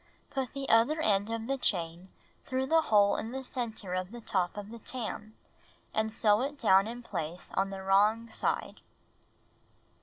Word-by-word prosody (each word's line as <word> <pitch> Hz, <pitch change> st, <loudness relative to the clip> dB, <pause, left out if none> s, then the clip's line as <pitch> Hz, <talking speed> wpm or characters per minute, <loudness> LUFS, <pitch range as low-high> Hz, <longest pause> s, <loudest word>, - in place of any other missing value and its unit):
Put 265 Hz, -4 st, -3 dB
the 275 Hz, -1 st, -4 dB
other 235 Hz, +8 st, +4 dB
end 205 Hz, -7 st, +2 dB
of 230 Hz, 0 st, -3 dB
the 270 Hz, +2 st, -2 dB
chain 175 Hz, -3 st, 0 dB, 0.4 s
through 260 Hz, 0 st, 0 dB
the 325 Hz, +4 st, +4 dB
hole 205 Hz, -7 st, +4 dB
in 225 Hz, -, -4 dB
the 265 Hz, +1 st, -5 dB
center 225 Hz, -7 st, -4 dB
of 185 Hz, 0 st, -2 dB
the 240 Hz, +3 st, -9 dB
top 190 Hz, -4 st, -1 dB
of 205 Hz, +1 st, -7 dB
the 235 Hz, -, -9 dB
tarn, 220 Hz, -2 st, -5 dB, 0.6 s
and 220 Hz, 0 st, 0 dB
sew 215 Hz, 0 st, +3 dB
it 285 Hz, +3 st, -3 dB
down 195 Hz, -5 st, +4 dB
in 240 Hz, +2 st, -7 dB
place 170 Hz, -4 st, -5 dB
on 195 Hz, +1 st, +1 dB
the 195 Hz, -1 st, -6 dB
wrong 210 Hz, +4 st, +3 dB
side. -, -, -2 dB
220 Hz, 175 wpm, -30 LUFS, 195-245 Hz, 0.6 s, other